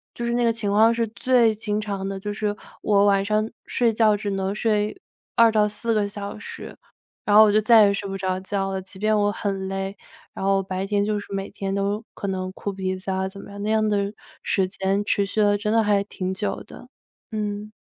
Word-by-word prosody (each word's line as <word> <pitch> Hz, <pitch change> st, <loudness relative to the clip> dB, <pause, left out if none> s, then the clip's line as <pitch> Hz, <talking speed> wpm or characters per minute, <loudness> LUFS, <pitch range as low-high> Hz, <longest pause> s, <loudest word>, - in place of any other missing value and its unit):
就 240 Hz, -, -4 dB
是 235 Hz, -, 0 dB
那 240 Hz, 0 st, +1 dB
个 230 Hz, -, +3 dB
情 215 Hz, -3 st, -2 dB
况 220 Hz, +3 st, +5 dB
是 230 Hz, 0 st, 0 dB
最 235 Hz, 0 st, +3 dB
经 210 Hz, -1 st, -2 dB
常 200 Hz, -2 st, -4 dB
的， 195 Hz, 0 st, -4 dB
就 205 Hz, +2 st, -4 dB
是 210 Hz, -1 st, -2 dB, 0.3 s
我 200 Hz, -1 st, +3 dB
晚 200 Hz, -1 st, +3 dB
上 215 Hz, +1 st, +1 dB, 0.2 s
睡 235 Hz, -2 st, +2 dB
觉 215 Hz, -1 st, +4 dB
只 205 Hz, 0 st, -3 dB
能 195 Hz, +1 st, -2 dB
睡 210 Hz, -1 st, 0 dB, 0.4 s
2-4 220 Hz, 0 st, +3 dB
个 210 Hz, -2 st, +1 dB
小 200 Hz, +1 st, -6 dB
时， 210 Hz, -, -9 dB, 0.5 s
然 205 Hz, -, +3 dB
后 215 Hz, -, +10 dB
我 215 Hz, -, +5 dB
就 215 Hz, -, +4 dB
再 220 Hz, 0 st, +7 dB
也 200 Hz, -, +2 dB
睡 200 Hz, 0 st, -3 dB
不 195 Hz, -, -4 dB
着 185 Hz, -1 st, -1 dB
觉 195 Hz, 0 st, -2 dB
了， 190 Hz, 0 st, -3 dB
即 190 Hz, +1 st, -12 dB
便 215 Hz, +1 st, +2 dB
我 205 Hz, 0 st, +2 dB
很 195 Hz, -2 st, -3 dB
累， 195 Hz, +1 st, -3 dB, 0.4 s
然 -, -, -4 dB
后 195 Hz, 0 st, +3 dB
白 190 Hz, 0 st, -3 dB
天 200 Hz, 0 st, +1 dB
就 210 Hz, 0 st, 0 dB
是 200 Hz, -, -9 dB
每 195 Hz, 0 st, -3 dB
天 195 Hz, -1 st, -4 dB
都 200 Hz, +2 st, -1 dB
可 200 Hz, -, -5 dB
能 185 Hz, -1 st, -3 dB
哭 200 Hz, +1 st, -5 dB
鼻 190 Hz, -1 st, -3 dB
子 185 Hz, +1 st, -8 dB
啊 190 Hz, 0 st, -1 dB
怎 195 Hz, +1 st, -10 dB
么 -, -, -12 dB
样， 200 Hz, 0 st, -8 dB
那 215 Hz, -, 0 dB
样 220 Hz, 0 st, +2 dB
的 200 Hz, 0 st, 0 dB, 0.3 s
时 190 Hz, -2 st, +1 dB
间 195 Hz, +1 st, -1 dB
持 200 Hz, 0 st, +1 dB
续 215 Hz, +2 st, -1 dB
了 205 Hz, 0 st, +4 dB
真 210 Hz, +1 st, -1 dB
的 225 Hz, 0 st, +4 dB
还 205 Hz, -1 st, +2 dB
挺 190 Hz, -2 st, -4 dB
久 205 Hz, +2 st, -3 dB
的， -, -, -13 dB, 0.4 s
嗯。 210 Hz, 0 st, -3 dB
205 Hz, 245 characters per minute, -24 LUFS, 195-215 Hz, 0.5 s, 后